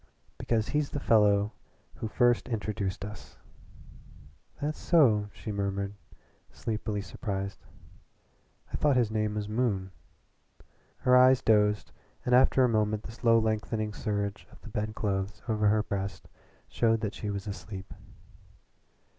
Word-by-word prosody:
"Because 110 -2 0
he's 150 -1 0
the 145 - -3
fellow 105 -4 +4 0.5
who 110 - -3
first 120 +2 +2
introduced 100 -4 -3
us." 105 0 -10 1.2
"That 150 +2 -1
so?" 115 -12 +3
she 110 - -7
murmured, 100 0 -2 0.6
sleepily 105 -2 -3
surprised. 100 -2 -4 1.1
"I - - 0
thought 145 -2 +3
his 120 -4 +2
name 105 -1 -1
was 105 -1 -3
Moon." 105 -4 -1 1.1
Her 125 -1 +5
eyes 130 0 +6
dosed, 105 -1 +3 0.3
and 125 - +1
after 130 +1 +5
a - - +5
moment 110 -2 +1
the - - -8
slow 115 0 +3
lengthening 110 -1 -1
surge 100 -1 -3
of - - -16
the - - -10
bedclothes 105 -2 -3
over 105 -2 +2
her 105 +1 +3
breast 100 -3 -4 0.4
showed 115 -1 +1
that 105 -2 -2
she 105 - -5
was 100 -1 -4
asleep. 100 -1 -7
105 Hz, 130 wpm, -29 LUFS, 100-115 Hz, 1.2 s, eyes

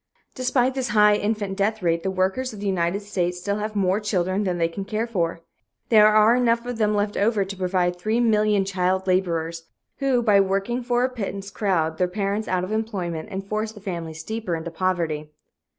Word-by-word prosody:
Despite 255 0 +1
this 260 -1 -2
high 210 0 +7
infant 205 -1 -1
death 210 +1 -1
rate, 170 -1 +1
the 190 - -2
workers 190 +7 -1
of 210 - -9
the 205 - -5
United 185 0 0
States 180 -3 -2
still 200 +3 -2
have 215 0 -4
more 195 0 +2
children 195 -1 0
than 180 -2 -1
they 165 -1 +2
can 165 +4 -6
care 215 +3 -2
for. 170 -7 -2 0.5
There 215 -2 +7
are 215 +2 +5
enough 235 -1 +2
of 245 -2 -5
them 210 -1 +2
left 205 0 0
over 205 -1 +2
to 195 +1 -6
provide 180 -1 0
3,000,000 215 -1 +2
child 190 0 0
laborers, 170 -3 -1 0.3
who 265 -3 +2
by 210 -3 +5
working 195 +6 -1
for 245 0 +1
a 255 - +2
pittance 200 -5 -5
crowd 165 -7 0
their 180 - +3
parents 200 +3 -2
out 185 -1 0
of 185 - -4
employment 200 -6 -3
and 195 0 -4
force 215 +2 -3
the 210 - -12
families 170 -5 -5
deeper 220 -6 -3
into 165 +1 -5
poverty. 165 -4 -1
200 Hz, 200 wpm, -24 LUFS, 180-215 Hz, 0.5 s, high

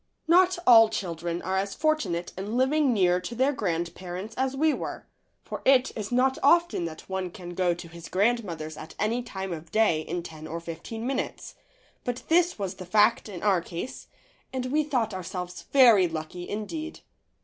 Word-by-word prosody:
Not 365 +2 +5
all 225 -2 +8
children 170 -3 -3
are 190 +2 -1
as 195 0 -3
fortunate 300 - 0
in 205 +5 -3
living 275 +2 +3
near 180 -5 +3
to 235 +6 -6
their 265 +4 +2
grandparents 180 0 -3
as 265 0 -1
we 310 +2 +3
were, - - -5 0.4
for - - -6
it 265 -1 +4
is 210 0 -5
not 260 +2 +2
often 340 - +3
that 160 -1 -8
one 190 -1 -3
can 175 -1 -9
go 175 -1 +1
to 175 0 -9
his 170 0 -11
grandmother's 185 -7 0
at 160 - -10
any 225 +4 0
time 190 -6 -5
of 160 0 -9
day 215 -8 +3
in 170 +2 -4
ten 155 -2 -9
or 165 +1 -4
fifteen 170 +7 -7
minutes, 265 +1 -3 0.5
but 245 -1 -3
this 350 +1 +3
was 195 -3 -3
the 185 - -8
fact 215 +3 +3
in 185 -4 -7
our 195 -4 +3
case 175 +8 -7 0.4
and 260 -1 -3
we 305 +1 +3
thought 245 -8 -1
ourselves 180 -1 -6
very 235 -9 +7
lucky 165 +2 -6
indeed. 310 +11 -5
200 Hz, 180 wpm, -27 LUFS, 175-255 Hz, 0.5 s, all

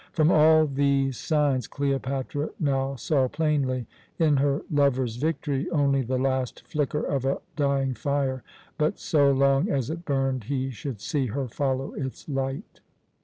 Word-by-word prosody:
From 160 0 +3
all 155 0 +6
these 140 -2 +1
signs 145 -5 +1
Cleopatra 140 +1 -2
now 135 -2 0
saw 135 0 +1
plainly, 135 -4 0 0.3
in 155 -3 +3
her 140 +1 +1
lover's 130 -5 +1
victory, 145 -1 -1
only 140 -4 +2
the 130 +1 -1
last 130 -1 -1
flicker 150 0 -1
of 135 -3 -1
a 135 +1 0 0.2
dying 140 -3 +1
fire; 135 -1 -1 0.4
but 155 0 +1
so 145 -3 +3
long 135 0 +3
as 135 0 -1
it 170 +1 -6
burned 135 -5 -1
he 135 +1 -2
should 115 -1 -6
see 145 -3 -1
her 130 +4 -3
follow 135 +2 -2
its 130 -2 -6
light. 135 - -4
140 Hz, 150 wpm, -26 LUFS, 130-145 Hz, 0.4 s, all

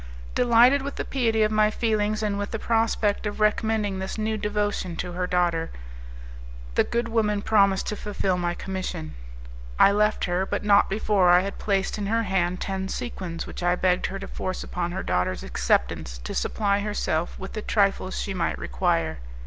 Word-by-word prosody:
Delighted 245 +3 +5
with 280 +1 -5
the - - -3
piety 225 -5 +1
of 215 - +1
my 215 0 +4
feelings 215 -1 0
and 205 -1 -1
with 205 - -3
the 225 - -3
prospect 225 -2 +1
of 205 - -5
recommending 215 -2 +1
this 190 +3 -4
new 220 0 -1
devotion 205 -4 -2
to 180 - -4
her 180 +1 -2
daughter, 175 -2 +1 1.0
the - - +4
good 235 0 -1
woman 210 -3 0
promised 200 -3 +3
to 210 - -2
fulfil 200 -3 -1
my 175 -1 -1
commission. 185 - -5 0.6
I 200 - +7
left 210 +1 +2
her, 180 +1 0
but - - -2
not 205 -1 +4
before 200 -3 +2
I 180 +1 +7
had 200 +1 -5
placed 195 0 0
in 200 - -2
her 230 +2 +1
hand 185 -2 0
ten 190 0 -3
sequins 185 -9 -5
which - - -8
I 175 0 +2
begged 180 0 +1
her 195 - -5
to 195 - -7
force 185 0 -4
upon 175 -1 -3
her 190 +2 -4
daughter's 90 +1 -1
acceptance 60 0 0
to - - -5
supply 200 - 0
herself 200 -5 -2
with 190 - -7
the 215 - -4
trifles 195 -3 +1
she 195 - -3
might 175 -3 -1
require. 80 +5 -1
200 Hz, 185 wpm, -25 LUFS, 180-215 Hz, 1.0 s, I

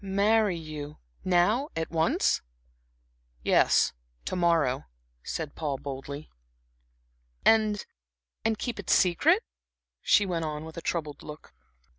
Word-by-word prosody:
"Marry 200 0 +2
you 155 -2 -7 0.3
now 200 - +2
at 160 -1 -3
once?" 160 -1 +2 1.0
"Yes, - - +4 0.3
to - - -3
morrow," 165 -7 +2 0.4
said 155 - -5
Paul, 145 -4 -3
boldly. 140 +2 -7 1.2
"And 215 -2 +4 0.6
and 220 -1 +1
keep 235 -1 -4
it 200 - -7
secret?" 315 - +4 0.6
she 205 - +4
went 170 -3 -2
on, 155 0 -4
with 160 - -10
a 170 - -6
troubled 155 -4 -3
look. 150 - -11
170 Hz, 115 wpm, -28 LUFS, 155-205 Hz, 1.2 s, Yes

